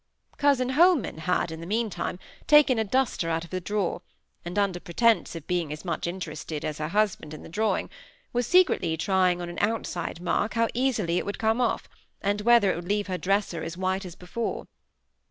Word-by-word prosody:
Cousin 275 -3 +3
Holman 290 - +3
had, 175 0 0
in 160 - -6
the 165 - -7
meantime, 215 -3 -2 0.3
taken 295 -5 +6
a - - +2
duster 220 -6 0
out 165 +1 -1
of 170 - -16
a 185 - 0
drawer, 205 0 -1 0.4
and, 175 +3 -6
under 200 -3 +1
pretence 220 +4 +2
of 165 -2 -7
being 175 -4 -1
as 150 +4 -7
much 170 -1 -2
interested 160 -4 -5
as 150 -1 -4
her 155 - -2
husband 195 -5 0
in - - -11
the - - -10
drawing, 215 +6 0 0.5
was 245 -1 0
secretly 360 - +3
trying 185 0 +2
on - - -4
an 175 - -6
outside 205 -6 -2
mark 205 +5 -1
how 230 0 +2
easily 220 -9 +1
it - - -4
would 200 - -3
come 225 +2 +1
off, 240 - 0 0.3
and 205 +1 0
whether 235 -3 +5
it - - -3
would 175 +1 -7
leave 205 0 +1
her 185 -2 -3
dresser 195 -3 0
as 165 +1 -5
white 190 +1 -1
as 180 -2 -8
before. 190 +6 -4
190 Hz, 200 wpm, -26 LUFS, 170-225 Hz, 0.5 s, taken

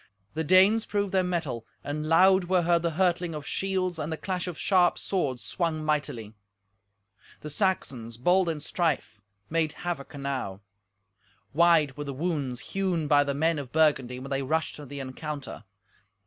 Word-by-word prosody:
The 160 - -2
Danes 190 +7 +5
proved 205 -2 -1
their 190 -1 +3
mettle, 165 -10 -2 0.2
and 150 +2 -3
loud 185 +3 +5
were 180 0 +2
heard 170 0 +3
the 170 - 0
hurtling 175 -3 +1
of 150 -2 -6
shields 185 -3 -1
and 155 +1 -3
the 160 - -2
clash 185 0 -3
of 175 -4 -5
sharp 180 -3 +3
swords 140 -10 -2
swung 160 -3 -2
mightily. 140 -8 -2 1.1
The 150 - -7
Saxons, 135 - -2
bold 180 +7 +3
in 155 -2 -3
strife, 145 - -2 0.3
made 160 -2 +1
havoc 165 -5 -4
enow. 135 -9 -4 0.9
Wide 160 -3 +4
were 145 - -4
the 140 -1 -5
wounds 145 -6 -3
hewn 185 -5 0
by 145 -1 +5
the 140 -1 -2
men 160 +1 +1
of 130 -4 -7
Burgundy 145 -6 +2
when 135 +2 -8
they 135 0 0
rushed 155 +4 -1
to 150 -1 -9
the 140 +2 -7
encounter. 135 -2 -6
155 Hz, 165 wpm, -27 LUFS, 140-180 Hz, 1.1 s, Danes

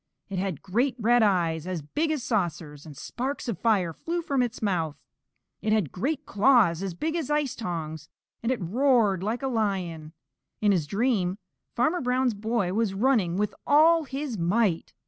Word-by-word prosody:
It 195 -2 -3
had 185 -6 -3
great 240 +8 0
red 240 +1 +3
eyes 175 -5 +1
as 180 -5 -3
big 305 - -1
as 305 -5 -1
saucers, 165 - -2
and 145 -3 -11
sparks 270 +2 -4
of 215 -8 -3
fire 195 -8 +2
flew 340 - -3
from 275 -5 0
its 245 -1 -2
mouth. 170 -8 -1 0.6
It 215 - -1
had 205 -10 +1
great 285 - -2
claws 205 - +4
as 190 -3 -4
big 315 - -2
as 325 -5 -2
ice 295 -3 0
tongs, 160 - -5 0.3
and 230 - 0
it 255 - -1
roared 215 0 +2
like 225 +7 -2
a - - 0
lion. 185 -9 -2 0.5
In 210 -1 +3
his 170 -6 +1
dream 200 - 0 0.4
Farmer 310 +9 +1
Brown's 250 -1 +1
boy 210 -3 -1
was 215 -2 0
running 205 -6 +2
with 210 0 0
all 320 +2 +5
his 270 -5 -4
might. 175 0 0
215 Hz, 175 wpm, -26 LUFS, 180-255 Hz, 0.6 s, all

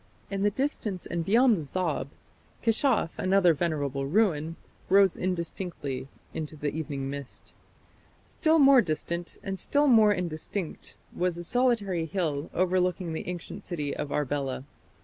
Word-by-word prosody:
In 195 0 -2
the 205 - +4
distance 215 - -2
and 170 -1 -2
beyond 230 +4 +4
the - - -3
Zab, 155 -3 -2 0.5
Keshaf, 225 - +2
another 185 -2 +4
venerable 145 -4 -1
ruin, 165 -3 +1 0.3
rose 195 -1 +5
indistinctly 170 -6 -3 0.3
into 155 -1 -5
the 145 -1 -2
evening 145 -3 -3
mist. 140 -1 -8 0.7
Still 320 0 +2
more 275 -3 +7
distant, 170 0 -3
and 195 -1 -4
still 290 +1 +2
more 220 -6 +6
indistinct, 175 -1 -3 0.2
was 180 -1 0
a 175 - -5
solitary 205 -6 +1
hill 155 -5 -2
overlooking 180 -1 +1
the 160 - -5
ancient 180 -2 -6
city 150 -5 -3
of 145 - -4
Arbela. 140 -2 -1
175 Hz, 135 wpm, -28 LUFS, 155-200 Hz, 0.7 s, more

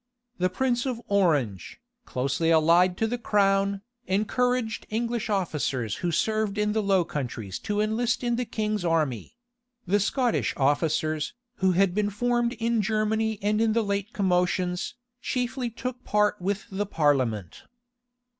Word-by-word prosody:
The 185 0 +2
prince 245 +5 0
of 250 -3 -2
Orange, 145 - +1 0.3
closely 135 +6 0
allied 170 +3 +4
to 225 - +1
the 240 +2 -2
crown, 200 -2 +2 0.2
encouraged 225 +4 0
English 230 0 -2
officers 145 - -1
who 175 - -1
served 215 +4 0
in 210 0 +1
the 220 +1 +1
Low 195 -4 +2
Countries 120 - -5
to 210 -1 -2
enlist 225 +3 0
in 240 -1 +1
the 250 - -1
king's 215 -3 -2
army: 155 - -1 0.5
the 200 +3 +2
Scottish 240 +4 0
officers, 155 +2 0 0.2
who 190 -1 +2
had 190 0 +3
been 205 +1 +1
formed 240 +3 0
in 230 -1 0
Germany 220 +1 0
and 210 +1 +2
in 225 -1 +3
the 230 0 +2
late 200 +1 -2
commotions, 180 -1 0 0.3
chiefly 250 0 -2
took 250 +2 -6
part 210 -1 +1
with 195 +2 -2
the 200 +1 -2
parliament. 130 - 0
205 Hz, 145 wpm, -26 LUFS, 170-225 Hz, 0.5 s, allied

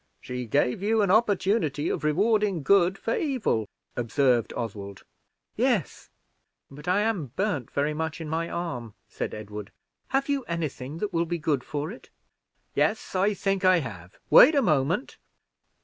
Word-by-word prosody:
"She 125 -1 -5
gave 125 - +1
you 215 +1 +2
an 195 - +2
opportunity 200 - +2
of - - -2
rewarding 200 +2 +2
good 190 +3 +4
for 225 - -1
evil," 245 - 0 0.3
observed 120 0 +1
Oswald. 100 -4 -6 0.5
"Yes, - - 0 0.6
but 145 +4 -12
I 185 +3 +3
am 210 -9 0
burned 190 - -1
very 145 +2 0
much 160 +1 -3
in 160 - -6
my 165 +2 -2
arm," 125 - -5
said - - -5
Edward. 105 -1 -8 0.4
"Have 270 0 0
you 280 -2 0
any 170 -3 -2
thing 135 +3 -8
that 200 +2 -3
will 170 0 +1
be 175 +1 -1
good 150 -5 0
for 150 +3 -4
it?" 235 - -12 0.6
"Yes, 220 - 0
I 195 +2 +2
think 195 -1 -1
I 185 -1 +6
have: 100 - -9
wait 310 - +9
a 280 - +4
moment." 155 - +1
165 Hz, 160 wpm, -26 LUFS, 130-200 Hz, 0.6 s, wait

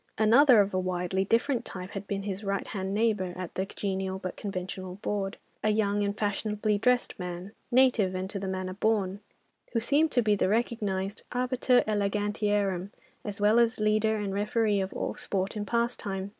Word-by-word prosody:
Another 235 +2 +7
of 200 0 -1
a 185 - +1
widely 185 +1 -1
different 235 +3 +1
type 185 -3 -7
had 195 0 -6
been 195 -1 -2
his 200 0 -4
right 195 -1 -1
hand 190 -2 -4
neighbour 205 -4 +1
at 180 -2 -6
the 190 +1 -2
genial 190 -1 -3
but 185 -1 -5
conventional 185 -2 -5
board—a 205 +1 -3
young 205 -1 +1
and 200 0 -2
fashionably 210 0 0
dressed 250 -1 +1
man, 180 +2 -5 0.2
"native 240 -7 +4
and 185 +1 -2
to 200 - -4
the 195 - -4
manner 185 0 -3
born," 200 -1 0 0.5
who 230 - +2
seemed 295 +7 +2
to 245 - +3
be 210 -1 +3
the 195 -2 +1
recognised 205 -3 -1
arbiter 250 0 +2
elegantiarum, 205 -2 0 0.3
as 205 -1 -5
well 210 +3 +5
as 235 0 +2
leader 215 +1 +2
and 205 -2 -2
referee 210 +1 +1
of 190 - -3
all - - -3
sport 195 +1 -3
and 205 -1 -3
pastime. 210 -4 -1
205 Hz, 175 wpm, -28 LUFS, 190-220 Hz, 0.5 s, Another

